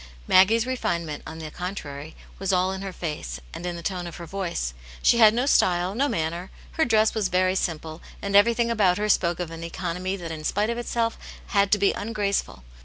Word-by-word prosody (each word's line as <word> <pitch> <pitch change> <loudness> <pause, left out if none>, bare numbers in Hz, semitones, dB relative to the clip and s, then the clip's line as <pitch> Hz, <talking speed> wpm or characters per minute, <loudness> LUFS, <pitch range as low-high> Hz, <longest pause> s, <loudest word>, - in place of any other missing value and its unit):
Maggie's 220 +5 +5
refinement, 170 -12 -2
on 160 - -7
the 155 -1 -7
con 180 +4 -4
trary, 145 -2 -8 0.2
was 195 0 0
all 185 0 +2
in 190 0 -5
her 195 -1 -4
face 150 - -5
and 180 - -5
in 175 - -3
the 170 - -8
tone 180 -1 -3
of 170 - -8
her 170 - -8
voice; 170 - -3 0.3
she 235 - +5
had 220 -2 +8
no 240 +4 0
style, 180 -8 +3
no 270 +6 +1
manner, 170 +1 -2 0.2
her 320 - +1
dress 220 -2 +3
was 215 -4 0
very 185 0 +2
simple, 160 -3 -3 0.2
and 200 0 -2
everything 235 +3 +4
about 195 -6 +3
her 210 +1 -1
spoke 175 -4 +2
of 175 -2 -4
an 165 0 -7
economy 180 +3 -3
that 170 -4 -6
in 155 -1 -6
spite 210 +7 0
of 235 - -3
itself 230 -1 -1 0.3
had 200 -2 +2
to 210 - +5
be 200 0 +3
ungraceful. 205 - -2
185 Hz, 215 wpm, -25 LUFS, 170-210 Hz, 0.3 s, had